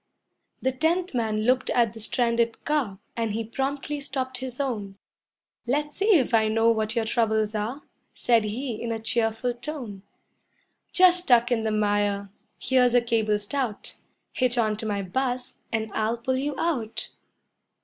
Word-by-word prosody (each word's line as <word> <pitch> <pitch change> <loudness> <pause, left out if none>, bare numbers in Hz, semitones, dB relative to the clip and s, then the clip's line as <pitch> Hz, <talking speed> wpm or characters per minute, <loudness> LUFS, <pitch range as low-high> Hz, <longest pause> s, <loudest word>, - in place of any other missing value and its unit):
The 260 - +2
tenth 330 +6 0
man 220 -3 0
looked 255 +2 +2
at 230 -3 +2
the 225 - -10
stranded 235 +1 0
car, 270 -10 0 0.2
And 225 -3 -1
he 225 +1 -1
promptly 275 +5 -3
stopped 260 -2 -3
his 260 -1 -6
own. 210 -8 -3 0.7
"Let's 295 +3 -1
see 410 0 +4
if 255 -4 0
I 220 -1 +4
know 225 +1 +3
what 220 0 -1
your 230 -1 +1
troubles 220 -2 +1
are," 220 +7 -3 0.3
Said 230 -3 +2
he 230 +2 -4
in 235 - -3
a 225 - -1
cheerful 225 +2 0
tone; 240 -6 -6 0.9
"Just 360 -1 +5
stuck 240 -3 +4
in 225 -2 +1
the 220 - +1
mire. 205 -1 0 0.3
Here's 250 -2 +3
a 245 - +6
cable 225 -3 +1
stout, 215 +1 -3 0.4
Hitch 255 -1 +1
onto 220 -1 0
my 200 -2 -1
bus 250 +5 -2
and 220 -2 -2
I'll 220 +2 0
pull 260 +3 -1
you 280 +2 -2
out." 250 -10 -1
235 Hz, 160 wpm, -26 LUFS, 220-260 Hz, 0.9 s, a